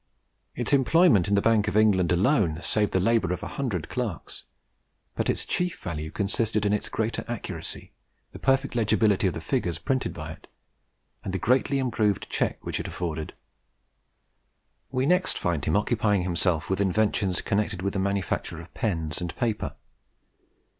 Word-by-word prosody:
Its -, -, -1 dB
employment 140 Hz, -, +5 dB
in 100 Hz, -, +2 dB
the 100 Hz, -, +2 dB
Bank 110 Hz, -2 st, +3 dB
of 105 Hz, -, 0 dB
England 100 Hz, -5 st, +4 dB
alone 90 Hz, -, +2 dB
saved 105 Hz, +3 st, +1 dB
the 95 Hz, -, +2 dB
labour 105 Hz, -2 st, +2 dB
of 90 Hz, -, -3 dB
a -, -, -3 dB
hundred 110 Hz, -, -3 dB
clerks; -, -, -5 dB, 0.7 s
but -, -, -1 dB
its -, -, 0 dB
chief 180 Hz, -1 st, -1 dB
value 80 Hz, -2 st, -4 dB
consisted 105 Hz, +3 st, 0 dB
in 100 Hz, -, +2 dB
its 105 Hz, -, -1 dB
greater 110 Hz, +1 st, -2 dB
accuracy, 95 Hz, -8 st, -5 dB, 0.4 s
the -, -, -10 dB
perfect 135 Hz, 0 st, +2 dB
legibility 110 Hz, -3 st, +3 dB
of 90 Hz, -, -2 dB
the -, -, -3 dB
figures 85 Hz, -1 st, -1 dB
printed 130 Hz, +10 st, -1 dB
by 80 Hz, -1 st, -7 dB
it, 80 Hz, -, -13 dB, 0.8 s
and 95 Hz, -, -4 dB
the -, -, +2 dB
greatly 130 Hz, +7 st, +2 dB
improved 110 Hz, -7 st, 0 dB
check -, -, 0 dB
which -, -, -2 dB
it -, -, -4 dB
afforded. 80 Hz, -3 st, -4 dB, 1.6 s
We 130 Hz, 0 st, 0 dB
next 180 Hz, +4 st, +2 dB
find 80 Hz, -5 st, -1 dB
him 80 Hz, +6 st, +2 dB
occupying 105 Hz, -2 st, +1 dB
himself 90 Hz, -1 st, 0 dB
with 95 Hz, +1 st, 0 dB
inventions 100 Hz, -1 st, +1 dB
connected 100 Hz, -3 st, -1 dB
with 100 Hz, -, -1 dB
the 95 Hz, -, -1 dB
manufacture 95 Hz, -3 st, -1 dB
of 85 Hz, +1 st, -12 dB
pens 80 Hz, -8 st, -2 dB
and 85 Hz, -2 st, -4 dB
paper. 115 Hz, -3 st, -2 dB
100 Hz, 165 wpm, -26 LUFS, 90-115 Hz, 1.6 s, employment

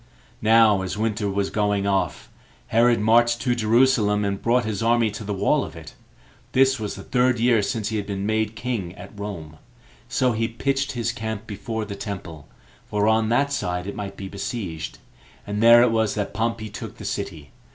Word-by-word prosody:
Now 110 Hz, -2 st, +5 dB
as 95 Hz, +2 st, -4 dB
winter 105 Hz, -1 st, -1 dB
was 100 Hz, 0 st, -1 dB
going 105 Hz, -1 st, 0 dB
off, 100 Hz, -1 st, -1 dB, 0.4 s
Herod 120 Hz, +1 st, +4 dB
marched 120 Hz, +2 st, +4 dB
to 125 Hz, -2 st, +1 dB
Jerusalem, 110 Hz, -2 st, +3 dB
and 100 Hz, -1 st, -2 dB
brought 120 Hz, +1 st, +2 dB
his 110 Hz, -2 st, -3 dB
army 115 Hz, -1 st, +3 dB
to 105 Hz, -, -7 dB
the 105 Hz, -, -5 dB
wall 100 Hz, -, +2 dB
of -, -, -8 dB
it; -, -, -10 dB, 0.6 s
this 135 Hz, 0 st, +4 dB
was 105 Hz, -2 st, -4 dB
the -, -, -9 dB
third 125 Hz, -1 st, +2 dB
year 115 Hz, -2 st, +4 dB
since 105 Hz, +1 st, -2 dB
he 110 Hz, -, -2 dB
had 100 Hz, -, -4 dB
been 100 Hz, -1 st, -3 dB
made 110 Hz, 0 st, 0 dB
king 110 Hz, -7 st, -3 dB
at -, -, -11 dB
Rome; 90 Hz, -7 st, -7 dB, 0.5 s
so 130 Hz, -1 st, +2 dB
he 115 Hz, 0 st, 0 dB
pitched 135 Hz, +4 st, -1 dB
his 120 Hz, -3 st, -1 dB
camp 110 Hz, -1 st, -5 dB
before 110 Hz, +1 st, -4 dB
the 100 Hz, -1 st, -6 dB
temple, 95 Hz, -7 st, -7 dB, 0.4 s
for 105 Hz, 0 st, 0 dB
on 110 Hz, 0 st, +3 dB
that 140 Hz, +4 st, +2 dB
side 90 Hz, -7 st, -2 dB
it 100 Hz, -, -5 dB
might 100 Hz, -1 st, -6 dB
be 95 Hz, -, -6 dB
besieged, 100 Hz, -5 st, -5 dB, 0.5 s
and 105 Hz, +1 st, -3 dB
there 115 Hz, +1 st, +8 dB
it 125 Hz, -, +3 dB
was 110 Hz, -2 st, +1 dB
that 105 Hz, -2 st, -3 dB
Pompey 110 Hz, -1 st, -2 dB
took -, -, -8 dB
the -, -, -9 dB
city. 75 Hz, -3 st, -5 dB
110 Hz, 195 wpm, -23 LUFS, 100-115 Hz, 0.6 s, there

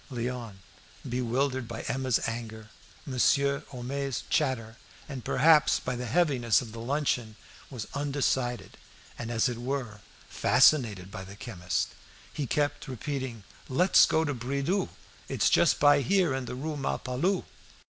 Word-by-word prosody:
'" -, -, -21 dB
Léon, 120 Hz, -3 st, -4 dB, 0.5 s
bewildered 125 Hz, +1 st, -1 dB
by 115 Hz, -, -6 dB
Emma's 130 Hz, -2 st, 0 dB
anger, 110 Hz, -2 st, -6 dB, 0.3 s
Monsieur 140 Hz, +1 st, +2 dB
Homais' 135 Hz, +1 st, -4 dB
chatter, 115 Hz, -6 st, 0 dB, 0.3 s
and, 135 Hz, -4 st, -7 dB
perhaps, 155 Hz, +2 st, +4 dB
by 125 Hz, -, -3 dB
the 125 Hz, 0 st, -4 dB
heaviness 125 Hz, -6 st, +3 dB
of 120 Hz, -4 st, -7 dB
the 115 Hz, -, -8 dB
luncheon, 120 Hz, -3 st, -1 dB, 0.3 s
was 125 Hz, -6 st, -6 dB
undecided, 135 Hz, -3 st, -1 dB, 0.4 s
and, 115 Hz, -, -4 dB
as 115 Hz, +2 st, +2 dB
it 120 Hz, -2 st, -4 dB
were, 120 Hz, -5 st, -4 dB, 0.3 s
fascinated 115 Hz, -8 st, +3 dB
by 95 Hz, -, -6 dB
the 95 Hz, +1 st, -11 dB
chemist, 95 Hz, -5 st, -2 dB, 0.4 s
who 145 Hz, -3 st, -3 dB
kept 145 Hz, +3 st, -1 dB
repeating 130 Hz, -3 st, -4 dB, 0.3 s
"Let's 180 Hz, +8 st, +5 dB
go 160 Hz, -, +2 dB
to 145 Hz, -, -1 dB
Bridoux'. 140 Hz, -, -1 dB, 0.4 s
It's -, -, +2 dB
just -, -, +4 dB
by 145 Hz, 0 st, +6 dB
here, 180 Hz, -1 st, +2 dB
in 130 Hz, -1 st, -3 dB
the 125 Hz, -, -5 dB
Rue 150 Hz, +3 st, -4 dB
Malpalu." 135 Hz, +6 st, -1 dB
130 Hz, 140 wpm, -28 LUFS, 115-140 Hz, 0.5 s, by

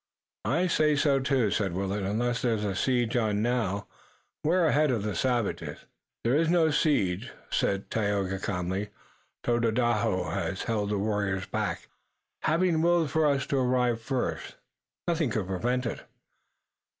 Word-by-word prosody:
"I 170 Hz, +9 st, +2 dB
say 155 Hz, -4 st, +3 dB
so, 145 Hz, -1 st, +3 dB
too," 130 Hz, -5 st, +1 dB
said 100 Hz, -5 st, 0 dB
Willet. 100 Hz, +2 st, -2 dB
"Unless 115 Hz, +5 st, -1 dB
there's 115 Hz, -4 st, 0 dB
a 100 Hz, -2 st, -1 dB
siege 120 Hz, 0 st, +1 dB
on 110 Hz, -3 st, +1 dB
now, 110 Hz, -5 st, 0 dB, 0.6 s
we're 170 Hz, +3 st, +3 dB
ahead 155 Hz, -1 st, +3 dB
of 115 Hz, -5 st, 0 dB
the 105 Hz, -1 st, -2 dB
savages." 120 Hz, +2 st, -1 dB, 0.4 s
"There 115 Hz, -, +2 dB
is 160 Hz, +2 st, +3 dB
no 165 Hz, -2 st, +4 dB
siege," 100 Hz, -, +1 dB, 0.2 s
said 100 Hz, 0 st, 0 dB
Tayoga 100 Hz, -3 st, 0 dB
calmly. 95 Hz, +1 st, -2 dB, 0.5 s
"Tododaho 115 Hz, -5 st, +1 dB
has 95 Hz, +2 st, -2 dB
held 105 Hz, -3 st, -1 dB
the 105 Hz, -, 0 dB
warriors 100 Hz, -2 st, -1 dB
back. -, -, -3 dB, 0.5 s
Having 165 Hz, 0 st, +2 dB
willed 170 Hz, -3 st, +3 dB
for 160 Hz, -1 st, +3 dB
us 140 Hz, -1 st, +1 dB
to 140 Hz, -, -1 dB
arrive 125 Hz, -2 st, +1 dB
first, 130 Hz, +2 st, -3 dB, 0.5 s
nothing 165 Hz, -5 st, +1 dB
could 105 Hz, -3 st, -1 dB
prevent 120 Hz, +8 st, -1 dB
it." -, -, -3 dB
120 Hz, 145 wpm, -28 LUFS, 100-140 Hz, 0.6 s, no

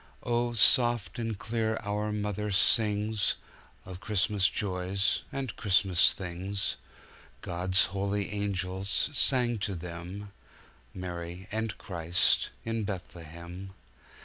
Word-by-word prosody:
Oh, 120 Hz, 0 st, 0 dB
soft 120 Hz, 0 st, +4 dB
and 115 Hz, -3 st, -2 dB
clear 110 Hz, +1 st, -1 dB
our 105 Hz, +1 st, -2 dB
mother 105 Hz, 0 st, -2 dB
singsOf 105 Hz, +1 st, +2 dB, 0.6 s
Christmas 105 Hz, -1 st, +2 dB
joys 95 Hz, 0 st, 0 dB
and 135 Hz, -5 st, -4 dB
Christmas 95 Hz, -3 st, +4 dB
things. 95 Hz, +2 st, -3 dB, 0.6 s
God's 90 Hz, +2 st, +2 dB
holy 100 Hz, +2 st, -2 dB
angels 100 Hz, +3 st, +1 dB
sang 125 Hz, -4 st, +3 dB
to 100 Hz, -1 st, -2 dB
them, 90 Hz, +4 st, -7 dB, 0.6 s
Mary 90 Hz, +1 st, -6 dB
and 110 Hz, -1 st, -2 dB
Christ 85 Hz, -1 st, +1 dB, 0.2 s
in 115 Hz, -1 st, -1 dB
Bethlehem. 90 Hz, -1 st, -7 dB
100 Hz, 95 wpm, -29 LUFS, 90-110 Hz, 0.6 s, soft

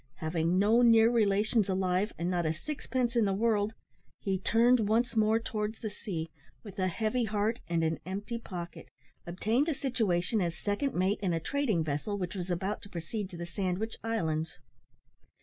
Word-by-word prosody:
Having 165 Hz, +2 st, 0 dB
no 215 Hz, +5 st, +4 dB
near 230 Hz, -1 st, +6 dB
relations 210 Hz, -1 st, +2 dB
alive, 185 Hz, +2 st, +1 dB
and 170 Hz, -, -2 dB
not 175 Hz, -2 st, 0 dB
a 160 Hz, -, 0 dB
sixpence 255 Hz, -, -2 dB
in 230 Hz, -2 st, +4 dB
the 195 Hz, -1 st, +1 dB
world, 215 Hz, 0 st, +1 dB, 0.4 s
he 190 Hz, -2 st, -1 dB
turned 230 Hz, +2 st, +4 dB
once 235 Hz, +2 st, +2 dB
more 220 Hz, 0 st, +4 dB
towards 215 Hz, -1 st, -3 dB
the 215 Hz, -, -4 dB
sea, 165 Hz, -6 st, -5 dB, 0.3 s
with 200 Hz, -2 st, -9 dB
a 185 Hz, -, +2 dB
heavy 220 Hz, +6 st, 0 dB
heart 215 Hz, +2 st, 0 dB
and 165 Hz, -1 st, +1 dB
an 160 Hz, 0 st, 0 dB
empty 205 Hz, +6 st, -4 dB
pocket, 175 Hz, -6 st, -7 dB, 0.4 s
obtained 220 Hz, -, +1 dB
a 310 Hz, -, 0 dB
situation 220 Hz, -6 st, 0 dB
as 170 Hz, -2 st, -1 dB
second 210 Hz, +7 st, -1 dB
mate 190 Hz, +3 st, +1 dB
in 185 Hz, -4 st, 0 dB
a 165 Hz, -, +1 dB
trading 220 Hz, -, 0 dB
vessel 155 Hz, +7 st, -2 dB
which 180 Hz, -3 st, -3 dB
was 185 Hz, -2 st, -5 dB
about 190 Hz, +4 st, -2 dB
to 200 Hz, -, -11 dB
proceed 190 Hz, +3 st, -4 dB
to 175 Hz, -, -9 dB
the 170 Hz, -, -4 dB
Sandwich 190 Hz, +4 st, -2 dB
Islands. 160 Hz, -8 st, -1 dB
205 Hz, 180 wpm, -30 LUFS, 175-225 Hz, 0.4 s, near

